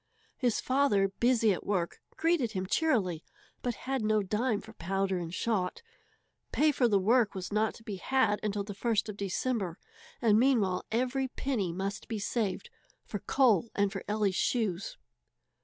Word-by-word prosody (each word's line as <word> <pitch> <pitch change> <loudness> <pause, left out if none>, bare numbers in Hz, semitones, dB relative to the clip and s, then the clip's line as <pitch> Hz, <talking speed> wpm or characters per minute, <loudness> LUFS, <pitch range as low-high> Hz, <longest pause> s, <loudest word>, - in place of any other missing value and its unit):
His 245 -4 +1
father, 255 -8 +2
busy 235 -4 +4
at - - -5
work, 180 -4 -2 0.2
greeted 320 -9 +1
him 185 -1 -2
cheerily, 190 - +1 0.4
but 245 -2 -2
had 265 -1 -1
no 215 -1 +2
dime 215 +3 0
for 220 +1 -12
powder 195 0 -1
and 165 -1 -5
shot. 190 - -1 0.7
Pay 305 +1 +4
for 255 -3 +2
the 205 -3 +3
work 220 +3 +3
was 190 +1 -5
not 215 +1 +1
to 225 - -14
be 210 -4 -5
had 260 -1 +2
until 205 -1 -1
the 205 0 -6
first 220 0 0
of 210 - -5
December, 200 -2 -2 0.4
and 220 -2 +4
meanwhile 225 -8 +2
every 255 +3 0
penny 245 -9 -2
must 195 +3 -4
be 225 - -3
saved 215 - -2 0.3
for 205 - -4
coal 235 -5 +3
and 200 -1 +2
for 195 -2 -5
Ellie's 210 -2 +1
shoes. 205 -2 -1
215 Hz, 165 wpm, -30 LUFS, 195-245 Hz, 0.7 s, busy